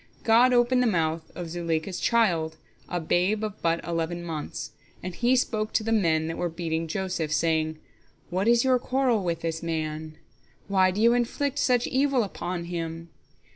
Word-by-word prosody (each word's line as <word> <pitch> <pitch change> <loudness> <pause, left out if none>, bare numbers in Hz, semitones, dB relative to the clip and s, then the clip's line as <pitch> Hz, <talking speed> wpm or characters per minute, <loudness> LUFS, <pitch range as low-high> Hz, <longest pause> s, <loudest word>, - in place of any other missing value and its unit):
God 240 +3 +5
opened 250 +1 +3
the 250 - +3
mouth 160 -5 -1
of 175 -1 -5
Zuleika's 170 +1 -2
child, 170 -9 +1 0.3
a 175 - -1
babe 180 +6 +1
of 215 -1 -5
but 165 0 0
eleven 170 0 -2
months, 160 -3 -5 0.3
and 185 0 -4
he 245 +6 +2
spoke 215 -4 0
to - - +2
the 225 - -2
men 165 -8 +2
that 165 +1 -4
were 175 - 0
beating 165 -1 -3
Joseph, 180 -3 -2
saying: 155 0 +1 0.5
"What 190 +4 0
is 235 0 +5
your 260 -1 +3
quarrel 255 -4 +1
with 170 -2 -2
this 165 -1 -3
man? 155 -1 -4 0.5
Why 190 -2 +4
do 190 +3 -3
you 230 +2 +5
inflict 255 +4 -1
such 245 -2 +2
evil 265 -2 +2
upon 180 -3 -4
him? 165 -1 -5
175 Hz, 175 wpm, -26 LUFS, 165-230 Hz, 0.5 s, God